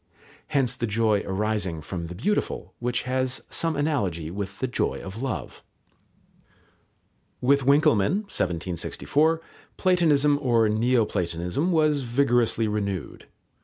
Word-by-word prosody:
Hence 125 -3 +2
the 120 - -2
joy 105 -1 +2
arising 95 -3 -1
from 85 +2 -5
the 90 - -8
beautiful, 105 - -2
which 120 0 -1
has 130 0 -2
some 165 -1 0
analogy 100 - -1
with 100 0 -5
the - - -1
joy 125 - -1
of 100 +5 -8
love. 135 -1 -4 1.8
With 140 +1 +3
Winckelmann 150 - +4
(1764) 95 - -1 0.4
Platonism 150 -6 +3
or 120 -4 +3
Neo 115 +2 +2
platonism 90 - -1
was 155 -3 +3
vigorously 120 -3 +1
renewed. 100 -5 -3
120 Hz, 115 wpm, -25 LUFS, 100-140 Hz, 1.8 s, Winckelmann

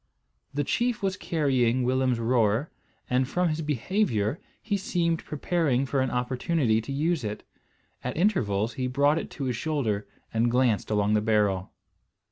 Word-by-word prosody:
The 145 +1 -1
chief 235 - 0
was 190 -1 +1
carrying 130 -8 +1
Willem's 130 0 +1
roer, 115 +3 +1 0.4
and 125 +1 +1
from 180 +4 +1
his 155 +1 -2
behaviour 150 - 0 0.2
he 210 -2 -2
seemed 170 -4 0
preparing 150 -4 0
for 135 0 0
an 130 - +1
opportunity 125 -1 +1
to 115 - -7
use 155 +2 0
it. 105 -1 -4 0.6
At 125 +2 -3
intervals 120 - +1
he 130 +2 -2
brought 145 +4 +3
it - - -6
to 140 - -6
his 125 -2 -1
shoulder 115 -9 -1 0.3
and 115 +1 +2
glanced 120 -3 +2
along 105 0 +2
the 105 - +3
barrel. 105 -4 +1
130 Hz, 155 wpm, -27 LUFS, 115-160 Hz, 0.6 s, brought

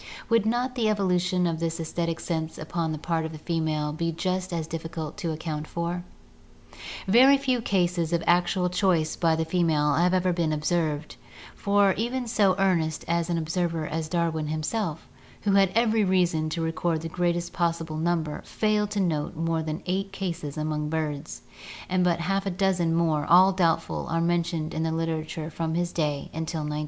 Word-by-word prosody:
Would 230 -2 +3
not 245 +3 0
the 240 -3 -1
evolu 195 -4 +2
tion 180 0 +1
of 165 -2 -1
this 165 0 -2
aesthetic 165 0 -2
sense 160 -2 -3
upon 160 +1 -2
the 155 - -3
part 165 +1 -1
of 160 0 -5
the - - -7
female 155 -2 -1
be 165 +2 -1
just 185 +2 -2
as 165 -2 -2
difficult 160 -1 -5
to 170 -5 -2
account 155 -1 -4
for? 170 +1 -3 1.0
Very 260 +7 +7
few 260 -3 0
cases 175 -5 0
of 170 -1 +1
actual 180 +1 +3
choice 180 -3 +1
by 165 -2 +2
the 160 0 -1
female 160 -4 +2
have 180 +4 +3
ever 180 -1 +2
been 170 -2 0
observed, 155 -1 -1 0.4
for 200 -1 +3
even 245 +3 -2
so 205 -5 +3
earnest 170 -5 +1
an 170 0 0
observer 165 0 -1
as 155 0 -3
Darwin 165 -3 0
himself, 155 +2 -2 0.4
who 205 - +2
had 195 -1 +5
every 225 -2 +3
reason 175 -5 +2
to 165 +1 -2
record 165 0 -1
the 165 - -4
greatest 175 +1 -1
possible 165 -2 -1
number, 160 -2 -1
failed 210 -1 0
to 210 -1 -2
note 160 -6 -1
more 165 0 0
than 155 +1 -4
eight 195 +2 -1
cases 175 -7 -4
among 150 -1 -2
birds, 155 -2 -3 0.4
and 185 0 +1
but 170 -1 +2
half 195 +3 0
a - - +2
dozen 180 -3 +1
more, 160 -3 +2
all 185 +3 +7
doubtful, 165 -3 0
are 165 0 0
mentioned 170 -1 0
in 160 - -2
the 160 0 0
literature 160 -1 -3
from 160 0 -2
his 175 0 0
day 150 -4 -1
until 160 0 -3
1907. 150 0 -3
170 Hz, 180 wpm, -26 LUFS, 160-185 Hz, 1.0 s, Very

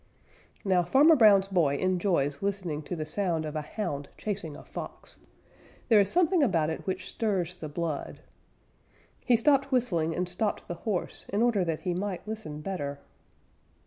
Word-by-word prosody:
Now 185 -2 +3
Farmer 290 - +5
Brown's 205 -6 +6
boy 165 -8 +2
enjoys 175 -6 0
listening 190 -6 -2
to 180 - -4
the 155 -2 -4
sound 165 -1 -1
of 155 0 -5
a 155 - -1
Hound 145 -3 -4
chasing 195 -8 -4
a - - -12
Fox. - - -9 0.7
There 220 -3 +7
is 200 -1 +3
something 355 0 +3
about 165 - +2
it 160 - -6
which 185 0 -3
stirs 190 -6 -1
the 160 -4 -8
blood. 155 -1 -4 1.0
He 245 - +4
stopped 275 +3 +3
whistling 170 -11 +1
and 180 0 -1
stopped 200 +4 -1
the - - -3 0.2
horse 185 -4 -3
in 205 +3 +1
order 230 -6 +3
that 165 -2 -2
he 180 -1 -1
might 195 +1 -4
listen 210 -9 -6
better. 145 -6 -4
185 Hz, 165 wpm, -28 LUFS, 160-210 Hz, 1.0 s, There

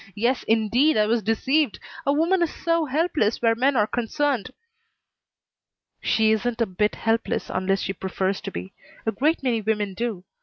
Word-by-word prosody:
Yes 240 +5 +1
indeed, 230 +7 +3
I 210 - +4
was 225 +2 +1
deceived. 255 +5 +1 0.3
A - - +5
woman 335 +6 +2
is 340 - +1
so 335 -1 0
helpless 295 -6 0
where 230 -1 +3
men 260 +4 +2
are 210 - +4
concerned." 255 +1 -1 1.5
"She 220 -1 +2
isn't 225 +2 0
a 230 - +3
bit 210 +2 0
helpless 225 0 -1
unless 195 +1 0
she 195 - -2
prefers 190 +1 -2
to - - -6
be. 90 +2 -7 0.3
A 220 - +1
great 300 +6 0
many 240 -4 +1
women 210 -2 -1
do. 220 -3 -3
230 Hz, 165 wpm, -24 LUFS, 210-280 Hz, 1.5 s, A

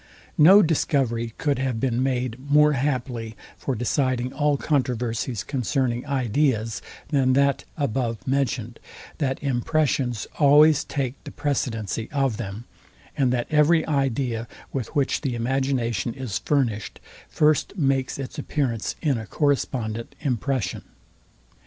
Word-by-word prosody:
No 190 +7 +8
discovery 125 -8 0
could 145 -4 0
have 130 -4 -1
been 125 -1 0
made 130 -2 -1
more 150 +1 +6
happily 125 -5 -2 0.2
for 135 - -3
deciding 125 +2 0
all 145 -1 +1
controversies 125 - -1
concerning 130 0 -1
ideas, 125 -4 0 0.3
than 135 -3 +3
that 140 0 +2
abovementioned, 125 -2 -1 0.4
that 135 -3 0
impressions 130 -3 0
always 150 +1 +6
take 135 -2 -4
the - - -8
precedency 115 - -2
of 135 -6 0
them, 105 0 -6 0.5
and 130 -3 +2
that 120 -1 0
every 155 +2 +4
idea, 130 -5 -1 0.3
with 130 -5 -2
which 140 -2 +1
the 135 -5 -2
imagination 120 -3 -1
is 125 -6 -3
furnished, 120 -8 -1 0.3
first 155 +5 +2
makes 135 -4 +1
its 135 -2 -6
appearance 120 -7 -2
in 140 -7 +1
a 110 - -8
correspondent 120 -6 -1
impression. 130 - -1
130 Hz, 120 wpm, -24 LUFS, 115-140 Hz, 0.5 s, No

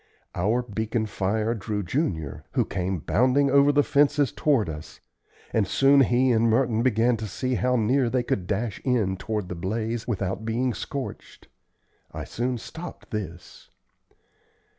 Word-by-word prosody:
Our 110 +8 +1
beacon 110 0 -2
fire 105 +2 -1
drew 105 -1 -3
Junior, 85 - -2
who - - +2
came 95 -2 -2
bounding 130 - +2
over 140 +1 +6
the 145 0 +3
fences 145 -1 +3
toward 140 - +1
us; 75 -1 -8 0.5
and 105 -3 +2
soon 135 +7 +4
he 125 0 +3
and 115 0 +3
Merton 115 -1 +2
began 120 -1 +2
to 110 0 -5
see 130 +6 -2
how 125 +1 +1
near 125 +2 +2
they 125 0 0
could 95 -6 -2
dash 105 +1 -2
in 115 -8 +1
toward 105 0 -3
the 90 - -5
blaze 110 +6 -3
without 95 -3 -2
being 120 +3 0
scorched. 140 +4 -7 0.6
I - - -6
soon 125 +1 -2
stopped 165 +9 -9
this. 90 -5 -7
115 Hz, 150 wpm, -25 LUFS, 100-130 Hz, 0.6 s, over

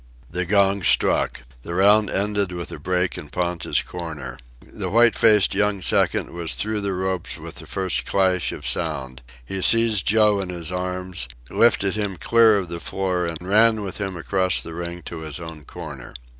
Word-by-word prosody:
The 90 0 -1
gong 100 0 +3
struck. - - +2 0.2
The 85 - -6
round 105 +2 +5
ended 100 -1 +1
with 85 -1 -6
a - - -7
break 90 0 -1
in 75 - -10
Ponta's 90 0 -1
corner. 85 -4 -7 0.2
The - - -6
white 115 +1 +4
faced 105 -3 +4
young 105 -2 +1
second - - +1
was 85 -1 -3
through 105 0 -1
the 100 -1 -2
ropes 95 -1 -2
with - - -9
the - - -7
first 95 -1 -2
clash 95 -2 +1
of - - -8
sound. 65 -1 -2 0.2
He 95 +8 -4
seized 115 -2 +3
Joe 105 -1 +4
in 95 -2 -4
his 85 -1 -5
arms, 90 -5 -3 0.2
lifted 100 -4 +3
him 100 -3 -2
clear 115 +1 +4
of 95 -3 -3
the 85 0 -4
floor, 90 -1 -2
and 85 +2 -6
ran 110 +1 +4
with 95 - -6
him 95 -3 -4
across 95 +2 0
the 85 - -7
ring 85 0 -6
to 85 - -7
his 80 -1 -7
own 80 -3 -9
corner. - - -9
95 Hz, 185 wpm, -22 LUFS, 85-100 Hz, 0.2 s, round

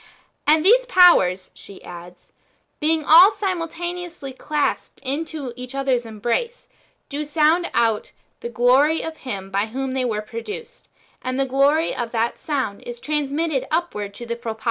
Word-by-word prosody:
^' - - -24 0.4
And 310 +2 +4
these - - +5
powers," 195 - +5
she 195 - -14
adds, 175 0 -12 0.2
" - - -45
being 315 0 +1
all 340 +6 +9
simultaneously 350 -6 -4
clasped 295 +3 -2
in 285 +5 -2 0.3
each 250 +1 -8
other's 260 -4 0
embrace, 240 - -3 0.4
do 290 +1 -4
sound 310 +3 +2
out 225 -2 +1 0.3
the 235 - -6
glory 255 +7 +3
of 320 -1 -6
Him 195 -7 -6
by 200 +2 0
whom 260 +3 -4
they 260 -1 -1
were 215 -4 -2
produced; 430 - -8 0.3
and 255 +1 -3
the 270 - +2
glory 280 +5 +2
of 235 -2 -4
that 230 0 -1
sound 260 -10 -3
is 240 0 -8
transmitted 295 0 -1
upwards 210 -12 -2
to 240 - -7
the 235 0 -3
Propator." 225 -2 -6
275 Hz, 160 wpm, -22 LUFS, 235-325 Hz, 0.4 s, all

